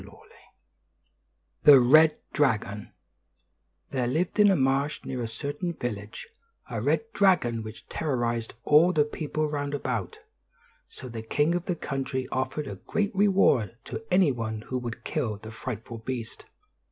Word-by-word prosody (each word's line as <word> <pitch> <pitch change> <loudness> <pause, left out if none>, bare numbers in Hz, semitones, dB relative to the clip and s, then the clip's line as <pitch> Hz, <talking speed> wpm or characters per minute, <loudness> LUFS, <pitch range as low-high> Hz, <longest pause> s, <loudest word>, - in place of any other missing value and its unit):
XVI - - -16 1.3
THE 145 -3 +9
RED 155 +5 +6 0.2
DRAGON 105 -7 0 1.0
THERE 130 -3 0
lived 165 - -1
in 205 -1 +7
a 195 - +4
marsh 135 +1 0
near 130 -2 -4
a 115 - -2
certain 145 +9 -4
village, 110 -7 -6 0.4
a - - -4
red - - +1
dragon 155 - +3
which 110 0 -10
terrorized 120 -6 -2
all 165 +5 +5
the 150 -3 +3
people 155 0 -2
round 145 -1 -3
about; 120 -9 -3 0.7
so 130 - -10
the 115 -2 -6
king 145 +8 +1
of 175 0 -2
the 180 - -1
country 135 -4 -3
offered 130 +3 -2
a - - -6
great 205 -2 -2
reward 190 - +3
to - - -6
any 180 -4 +4
one 110 -3 -4
who 130 +3 -4
would 120 -2 -6
kill 110 -4 -2
the 110 +2 -10
frightful 115 0 -6
beast. 115 -1 -6
130 Hz, 150 wpm, -27 LUFS, 115-155 Hz, 1.3 s, THE